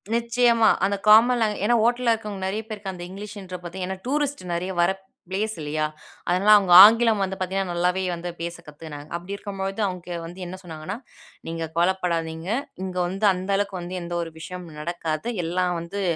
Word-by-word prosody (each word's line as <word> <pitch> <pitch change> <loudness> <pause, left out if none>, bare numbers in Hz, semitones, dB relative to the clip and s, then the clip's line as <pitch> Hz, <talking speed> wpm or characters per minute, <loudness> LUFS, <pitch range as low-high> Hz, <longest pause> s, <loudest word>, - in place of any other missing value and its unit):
நிச்சயமா! 235 -1 +3 0.2
அந்த 200 +1 +1
common 235 +4 +7
language 210 -3 0
ஏன்னா 240 - +4
ஹோட்டல்ல 240 0 +2
இருக்கவங்க 210 -3 -5
நெறைய 210 +3 -2
பேருக்கு 205 -3 -5
அந்த 175 -1 -8
இங்கிலீஷ்ன்ற 195 -1 -8
பாத்தீங்கன்னா 185 +2 -4
ஏன்னா - - -27
டூரிஸ்ட் 285 0 -1
நெறைய 180 +2 -2
வர 175 +2 +4 0.4
பிளேஸ் 215 +3 -2
இல்லையா? 155 +1 -1 0.4
அதனால 185 +4 +2
அவங்க 190 -3 0
ஆங்கிலம் 225 -1 +5
வந்து 190 0 -3
பாத்தீங்கன்னா 190 0 -2
நல்லாவே 180 +2 +1
வந்து 175 +1 -5
பேச 170 0 -4
கத்துக்கினாங்க! 150 -1 -9
அப்டி 180 +4 -5
இருக்கும்போது 195 0 -4
அவங்க 180 -1 -6 0.2
வந்து 175 +3 -10
என்ன 180 +2 -6
சொன்னாங்கன்னா, 165 +2 -6 0.5
நீங்க 165 0 -3
கவலப்படாதீங்க, 170 -1 0 0.3
இங்க 185 -1 -5
வந்து 195 +4 -2
அந்த 185 +2 -6
அளவுக்கு 200 -1 -1
வந்து 175 +1 -6
எந்த 170 0 -6
ஒரு 165 -1 -5
விஷயமும் 170 -1 -8
நடக்காது. 165 +2 -3 0.2
எல்லாம் 180 +2 0
வந்து 185 +4 -5
190 Hz, 170 wpm, -24 LUFS, 175-210 Hz, 0.5 s, common